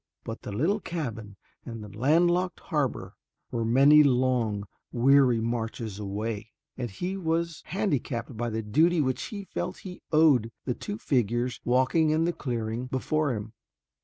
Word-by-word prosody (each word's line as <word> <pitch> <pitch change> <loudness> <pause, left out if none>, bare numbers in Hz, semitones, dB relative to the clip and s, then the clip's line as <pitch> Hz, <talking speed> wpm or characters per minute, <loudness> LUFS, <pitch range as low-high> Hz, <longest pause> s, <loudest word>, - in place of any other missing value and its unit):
But 115 - -6
the - - -7
little 160 - +1
cabin 115 - -5 0.3
and 115 -3 -7
the 105 0 -11
land 155 +9 +4
locked 180 0 -1
harbor 135 - -2 0.4
were 115 - -1
many 135 +6 +6
long, 125 -6 +2 0.3
weary 130 -1 +4
marches 115 -2 -3
away, 105 +2 -4 0.2
and 125 -2 -4
he 180 - -4
was 170 -2 -1
handicapped 140 - -2
by 120 +2 -2
the 110 0 -3
duty 160 +11 +3
which 130 -3 0
he 200 -2 -6
felt - - -4
he 180 -1 -8
owed 150 -7 +5
to 115 - -9
the 125 - 0
two 205 - -6
figures 120 - 0
walking 130 +6 +3
in 155 +2 +2
the 175 - 0
clearing 120 -3 -3
before 140 +1 0
him. 105 +1 -6
125 Hz, 160 wpm, -27 LUFS, 115-155 Hz, 0.4 s, many